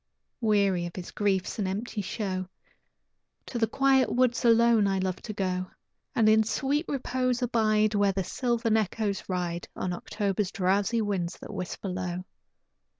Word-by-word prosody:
Weary 200 -5 +2
of 170 - -10
his 180 -2 -7
griefs 200 +1 0
and 200 - 0
empty 210 +3 -3
show, 185 -2 -3 1.0
To 240 - -4
the 225 - +3
quiet 270 +2 +3
woods 245 -1 +2
alone 230 -2 +5
I 195 0 +1
love 185 -1 -1
to 220 - -7
go, 185 -2 -2 0.5
And 225 -2 +4
in 220 0 +6
sweet 280 +8 0
repose 255 -2 -1
abide 215 -3 +2
Where 205 -1 +3
the 190 0 -2
sylvan 235 +1 0
echoes 210 -1 -2
ride 175 -2 -2
On 180 - -2
October's 200 +1 -2
drowsy 200 +5 +1
winds 185 -4 -2
that - - -9
whisper 185 +2 -5
low. 180 0 -3
205 Hz, 150 wpm, -28 LUFS, 185-230 Hz, 1.0 s, in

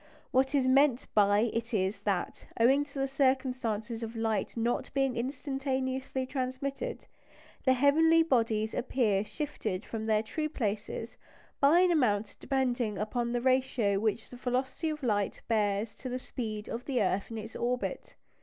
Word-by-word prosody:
What 265 +2 +2
is 265 -2 +3
meant 270 -1 +4
by 205 0 +4
it 230 +1 -2
is 195 +1 0
that, 200 -3 -2
owing 270 +5 +4
to 280 -1 -12
the 270 0 +1
circumstance 260 -5 0
of 230 0 -5
light 225 -1 -1
not 235 +1 0
being 270 -2 +1
instantaneously 265 0 -2
transmitted, 270 - -3 0.6
the 260 - +6
heavenly 320 +5 +5
bodies 225 -7 +1
appear 220 -6 +1
shifted 215 -7 -4
from 220 -1 -4
their 215 0 +2
true 305 +7 -3
places 220 -3 -3 0.4
by 300 +6 +6
an 365 -1 +4
amount 220 -9 +1
depending 245 -5 0
upon 235 +3 -1
the 240 0 0
ratio 255 -6 +2
which 220 +1 -1
the 250 - -9
velocity 260 +6 -1
of 300 -2 -5
light 205 -4 0
bears 210 -1 +1
to 255 - -6
the 250 - -2
speed 215 -4 -5
of 235 +2 -5
the 265 -3 0
earth 195 0 0
in 225 - -5
its 220 +1 -7
orbit. 245 +2 -2
245 Hz, 155 wpm, -30 LUFS, 215-270 Hz, 0.6 s, the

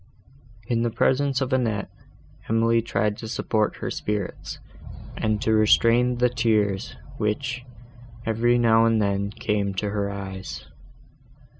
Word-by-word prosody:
In 115 0 0
the 120 - +1
presence 135 +3 +1
of 130 0 -1
Annette, 115 -6 0 0.6
Emily 115 +1 +3
tried 105 -2 -1
to 110 - -7
support 110 -1 0
her - - -5
spirits, 105 -3 -4 0.6
and 110 -1 0
to 110 - +2
restrain 115 +3 +4
the 125 +1 +4
tears, 105 -5 0 0.2
which, 125 +4 -2 0.6
every 115 +2 +2
now 115 -1 +4
and 115 -1 +3
then, 100 -1 0
came 100 -1 -2
to 100 +2 -2
her 100 -1 -1
eyes. 95 -9 -7
110 Hz, 130 wpm, -24 LUFS, 105-120 Hz, 0.6 s, restrain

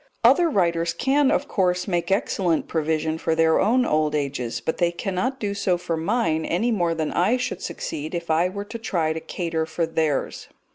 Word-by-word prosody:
Other 345 -2 +5
writers 170 - +1
can, 275 +1 +2
of - - +1
course, 180 -1 0
make 175 -3 -1
excellent 185 -3 +1
provision 160 0 -1
for 160 -1 0
their 160 0 +3
own 245 +5 +3
old 155 -4 +1
ages, 135 -5 -2
but 140 +7 -3
they 175 -1 +2
cannot 195 +9 -2
do 205 -2 -2
so 190 -3 +1
for 175 -1 -3
mine, 165 -2 0
any 225 +10 0
more 175 -6 +1
than 155 -2 -2
I 205 +8 +2
should 250 - -3
succeed 155 +3 -5
if 170 -1 -3
I 165 +3 +3
were 200 +2 -6
to 230 +3 -7
try 170 -8 0
to 160 - -4
cater 165 -1 -3
for 165 +1 -1
theirs. 160 -3 -1
170 Hz, 195 wpm, -23 LUFS, 160-200 Hz, -, Other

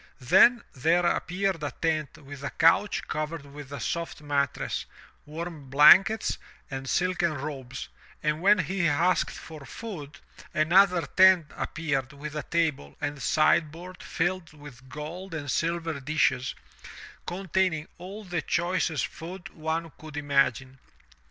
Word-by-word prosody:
Then 190 - +5
there 165 +6 +2
appeared 180 0 0
a 145 - -2
tent 155 -3 -2
with 140 -1 -11
a 140 - -2
couch 165 +5 +3
covered 155 -1 -4
with 140 -1 -11
a 140 - -5
soft 170 +7 -3
mattress, 145 -2 -1 0.4
warm 155 -2 -7
blankets, 190 +10 +6 0.3
and 135 0 -5
silken 175 -3 +1
robes, 130 -2 -6 0.4
and 150 +1 0
when 205 +3 +6
he 180 0 0
asked 170 +5 +2
for 155 -3 -10
food, 155 -4 -8 0.4
another 175 +3 +4
tent 185 -5 +5
appeared 140 -4 -2
with 150 +2 -7
a 150 - -2
table 155 - -1
and 145 -1 -4
sideboard 165 +5 +1
filled 175 -1 -2
with 140 -4 -13
gold 165 +6 -7
and 145 -3 -4
silver 165 0 -1
dishes, 135 -3 0 0.7
containing 180 -3 -1
all 195 +4 -8
the 175 -3 -2
choicest 175 -2 0
food 185 +3 -9
one 160 0 -3
could 155 -1 -9
imagine. 135 -2 +1
160 Hz, 130 wpm, -27 LUFS, 145-175 Hz, 0.7 s, blankets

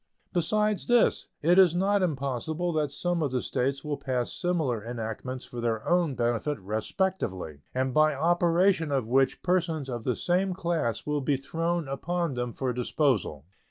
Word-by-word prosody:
Besides 210 +2 +1
this, 240 -1 +3 0.2
it 175 +4 +5
is 180 -3 +6
not 200 +2 +2
impossible 155 +2 -1
that 150 -3 0
some 175 +4 -1
of 145 -4 0
the 130 - 0
States 135 +3 -1
will 150 -2 -2
pass 125 -2 -1
similar 155 - -1
enactments 120 +2 -5
for 120 - -7
their 115 -2 -1
own 175 -5 +2
benefit 120 +5 0
respectively, 105 - -2 0.2
and 130 0 0
by 155 0 +4
operation 170 +1 +2
of 135 -4 +1
which 130 +3 +2
persons 165 -6 0
of 120 -3 -4
the 125 -1 0
same 180 - 0
class 170 -10 -1
will 150 -1 -1
be 135 +1 +1
thrown 165 +4 -2
upon 170 +3 -2
them 125 -1 -2
for 130 +1 -2
disposal. 120 - 0
145 Hz, 160 wpm, -28 LUFS, 125-175 Hz, 0.2 s, is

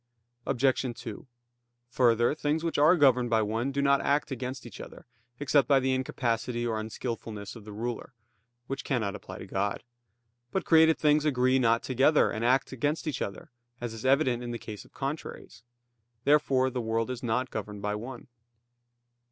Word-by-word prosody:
Obj. 130 0 +2 0.2
2: 120 +1 -8 0.6
Further, 120 -1 +3
things 155 +1 -1
which 165 -3 -1
are 155 +5 +6
governed 125 -5 +4
by 110 -1 +3
one 115 +5 -1
do 140 +1 -1
not 140 0 +4
act 145 +1 +1
against 130 0 -5
each 120 - -9
other, - - -11 0.3
except 140 -2 +3
by 140 -1 +5
the 130 0 +1
incapacity 120 -2 -1
or 110 -2 -1
unskillfulness 110 -1 -5
of 110 -3 -12
the 105 - -9
ruler; 120 +3 -5 0.5
which 135 +3 -5
cannot 110 -8 -1
apply 95 -2 -9
to - - -8
God. 100 +1 -2 0.7
But 190 - -1
created 160 -1 +5
things 150 0 +3
agree 130 -3 +2
not 115 -2 +2
together, 135 +4 +3
and 110 - -3
act 130 +3 +2
against 145 +6 -1
each 150 -5 -3
other; 140 - -5 0.3
as 120 -2 -4
is 115 - -8
evident 130 -2 +3
in 120 - -5
the 120 - -3
case 105 -3 -9
of - - -21
contraries. 140 -6 -6 0.6
Therefore 135 -3 +3
the 125 0 -2
world 115 +2 -1
is 125 - -5
not 125 +2 -1
governed 105 -1 -6
by 105 0 -1
one. 120 +5 -7
125 Hz, 175 wpm, -28 LUFS, 115-140 Hz, 0.7 s, are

